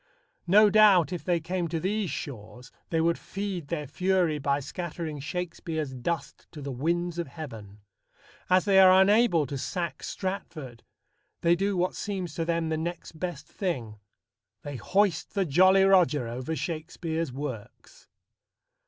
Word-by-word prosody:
No 205 +3 +6
doubt, 195 -5 +6
if 175 - -5
they 175 -2 +1
came 175 +2 -2
to 165 0 -2
these 200 +2 -1
shores, 120 -4 -7 0.2
they 165 - +1
would 165 +1 +1
feed 195 -5 -5
their 150 -2 -3
fury 180 +1 +1
by 140 0 +1
scattering 160 +1 -5
Shakespeare's 160 -2 -4
dust 140 +5 -4
to 155 - -9
the 140 - -4
winds 170 +6 -1
of 170 - -2
heaven. 115 -9 -9 0.7
As 185 +2 +4
they 195 -2 +5
are 185 0 +8
unable 195 -5 +4
to 140 +1 -5
sack 175 +4 -3
Stratford, 155 -10 -5 0.6
they 170 0 +4
do 195 +1 -1
what 180 +1 +1
seems 190 -6 -4
to 165 - -2
them 165 -1 0
the 160 - 0
next 170 -1 -6
best 175 -5 -4
thing: 120 - -4 0.6
they 145 -2 -5
hoist 185 - 0
the 195 -2 +2
Jolly 185 +5 +5
Roger 175 -9 +4
over 130 +7 -4
Shakespeare's 160 -1 -3
works. 130 - -8
170 Hz, 150 wpm, -27 LUFS, 145-185 Hz, 0.7 s, are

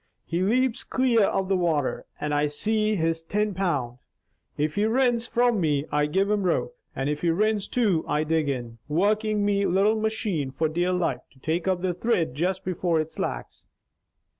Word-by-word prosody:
He 170 +2 -2
leps 240 +5 +1
clear 245 -5 +2
of 195 -1 0
the 195 - +2
water 165 -6 0
and 150 0 -2
I 145 0 +2
see 215 +8 0
he's 165 -2 0
tin 210 +5 -1
pound. 145 -10 -2 0.6
If 150 +1 0
he 205 +4 +1
rins 240 0 +2
from 240 -4 +2
me, 150 -3 +1
I 150 0 +2
give 190 +6 +1
him 210 -1 +1
rope, 185 - 0 0.2
and 135 - -2
if 150 0 -2
he 175 - +1
rins 210 +4 +1
to, 205 -10 +1
I 150 +1 +1
dig 155 -1 0
in, 120 -4 -4
workin' 210 +5 +1
me 200 -1 +2
little 200 +4 +3
machane 215 - -1
for 160 +2 +1
dear 175 +3 0
life 170 -9 0
to 130 - -23
take 165 +5 -2
up 185 -2 +1
the 185 -1 0
thrid 180 - 0 0.3
before 175 -2 0
it 155 0 -3
slacks. - - -5
180 Hz, 185 wpm, -25 LUFS, 155-215 Hz, 0.6 s, little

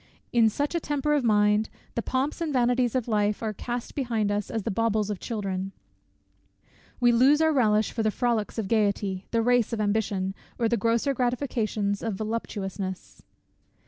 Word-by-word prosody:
In 230 -2 +5
such 285 +8 -2
a 340 - +1
temper 295 -1 -1
of 290 -3 +2
mind, 210 -1 +3 0.2
the 235 - -1
pomps 265 - -2
and 325 -2 -1
vanities 245 -1 +2
of 250 -3 0
life 210 -1 0
are 215 -1 -1
cast 240 +3 -5
behind 230 -6 0
us 205 -1 -2
as 225 -2 -3
the - - -2
baubles 215 0 0
of 200 - -4
children. 195 -4 -3 1.3
We 240 -1 +5
lose 260 +5 +5
our 320 0 +3
relish 215 -5 +3
for 230 - -2
the 215 - +2
frolics 230 -1 -1
of 220 -3 -2
gaiety, 200 -3 0
the 230 -1 +1
race 245 -1 +2
of 225 - -2
ambition, 205 -2 0 0.2
or 235 - +2
the 235 - +2
grosser 230 +5 +1
gratifications 235 -5 -1
of 225 -3 -2
voluptuousness. 195 -3 -4
225 Hz, 175 wpm, -26 LUFS, 210-245 Hz, 1.3 s, In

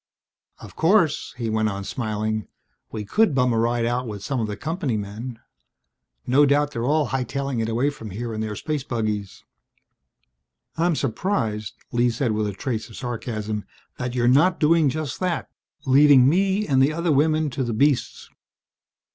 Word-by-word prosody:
"Of - - -12
course," 165 -2 +2
he 120 -2 -3
went 110 0 +1
on, 100 -1 -4
smiling, 110 -1 -3 0.4
"we 105 -2 -5
could 210 - +2
bum 125 -2 +2
a 115 - +1
ride 120 0 +1
out 120 +1 -1
with 105 -3 -6
some 135 -3 -2
of 110 - -1
the 105 -1 -5
company 155 - -2
men. 110 +4 -6 0.9
No 135 +4 +4
doubt 145 +1 +3
they're 120 -3 -3
all 150 -2 +2
hightailing 135 0 -2
it 110 - -1
away 125 +6 +1
from 115 -7 -9
here 115 +4 -5
in 110 - -3
their 110 -1 -3
space 150 +4 -3
buggies." 105 -5 -3 1.3
"I'm 170 0 +1
surprised," 115 - -2 0.2
Lee 120 0 +2
said 120 0 -1
with 105 0 0
a 100 - -3
trace 110 +2 -4
of 110 - -12
sarcasm, 110 -4 -4 0.4
"that 125 0 -3
you're 120 -1 +2
not 160 +9 +4
doing 160 -1 +4
just 150 -1 -4
that, 180 -2 -2 0.3
leaving 135 -1 +6
me 195 +6 +2
and 135 -5 +3
the 135 +3 +4
other 170 +1 0
women 155 +1 +2
to 130 - -2
the 120 - -2
beasts!" 135 +4 0
125 Hz, 170 wpm, -23 LUFS, 110-145 Hz, 1.3 s, leaving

